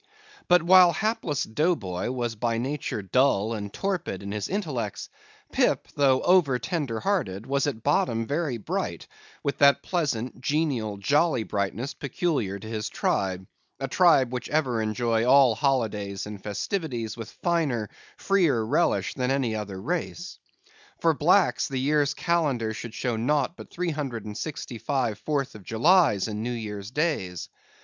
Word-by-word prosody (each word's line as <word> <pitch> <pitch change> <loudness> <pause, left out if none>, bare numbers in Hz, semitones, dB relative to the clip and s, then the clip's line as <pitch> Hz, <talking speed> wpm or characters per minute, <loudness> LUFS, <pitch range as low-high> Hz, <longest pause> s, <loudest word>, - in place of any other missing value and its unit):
But 180 -1 +5
while 180 0 +7
hapless 180 - -1
Dough 155 +10 +1
Boy 95 - -4
was 120 -2 -2
by 115 +1 -1
nature 130 -4 -3
dull 110 0 +2
and 100 -2 -5
torpid 175 - -3
in 100 - -5
his 105 0 -3
intellects, 150 - -3 0.4
Pip, - - +1
though 135 -2 +3
over 175 -8 +4
tender 140 -7 -2
hearted, 110 - -1
was 140 +2 0
at 115 -6 -4
bottom 115 -5 +1
very 145 -2 -1
bright, 105 - -3 0.4
with 140 - -2
that 140 0 +5
pleasant, 130 -9 -2
genial, 130 -9 -1
jolly 145 - +2
brightness 105 +6 -2
peculiar 140 - -2
to 100 - -10
his 110 -1 -3
tribe; 95 -1 -1 0.3
a 135 - -2
tribe, 135 -5 +4
which 125 - -4
ever 130 -7 +1
enjoy 110 +1 0
all 130 -1 +6
holidays 110 -7 -1
and 105 -1 -8
festivities 115 - -3
with 115 -2 -7
finer, 150 -11 -1 0.3
freer 170 - +2
relish 170 +10 +1
than 125 -1 -1
any 135 -5 0
other 100 -3 -5
race. 175 - -4 0.6
For 165 -1 +3
blacks, 175 +5 +3
the 135 - -4
year's 145 +2 +1
calendar 140 -10 0
should 115 0 -7
show 120 -3 -1
naught 145 +6 0
but - - -11
three 175 -1 -2
hundred 135 -8 -4
and 105 -1 -6
sixty 125 -3 -5
five 125 -7 -1
Fourth 140 0 -2
of 110 - -11
Julys 120 - +3
and 105 -1 -4
New 120 +2 -2
Year's 105 -3 -5
Days. 130 - -2
130 Hz, 155 wpm, -26 LUFS, 110-150 Hz, 0.6 s, while